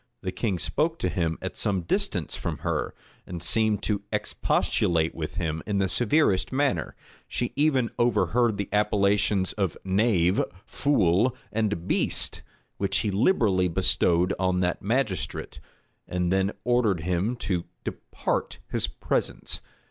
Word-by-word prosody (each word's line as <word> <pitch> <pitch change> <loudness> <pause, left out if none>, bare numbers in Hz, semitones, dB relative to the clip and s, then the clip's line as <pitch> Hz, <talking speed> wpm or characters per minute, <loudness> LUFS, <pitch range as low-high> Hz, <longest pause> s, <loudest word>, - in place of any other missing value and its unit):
The 95 - -2
king 95 0 -1
spoke 160 - -1
to 90 - -1
him 85 -2 -1
at - - -4
some 95 -3 0
distance 85 - -1
from - - -4
her; - - -1 0.3
and 85 -2 -5
seemed 110 +3 +2
to 105 -2 0
expostulate 80 -2 +1
with 80 -1 -5
him 80 -3 -2
in 105 -2 0
the 95 -1 +2
severest 115 - +2
manner: 130 - 0 0.3
she 120 - -2
even 140 -5 +2
overheard 120 -1 +2
the 100 -1 -2
appellations 100 -2 +2
of 95 -5 -1
"knave," 95 -2 +2 0.2
"fool," 115 -3 +2 0.2
and 105 -5 -1
"beast," - - +1 0.4
which 100 -1 +1
he 105 - -1
liberally 100 - +3
bestowed 85 +1 +3
upon 90 -1 0
that 90 -1 0
magistrate; 110 - -2 0.5
and 90 0 0
then 95 +1 +2
ordered 120 -8 +2
him 90 +7 0
to 95 -6 -2 0.2
depart - - -3
his - - +1
presence. - - -2
100 Hz, 135 wpm, -26 LUFS, 90-115 Hz, 0.5 s, liberally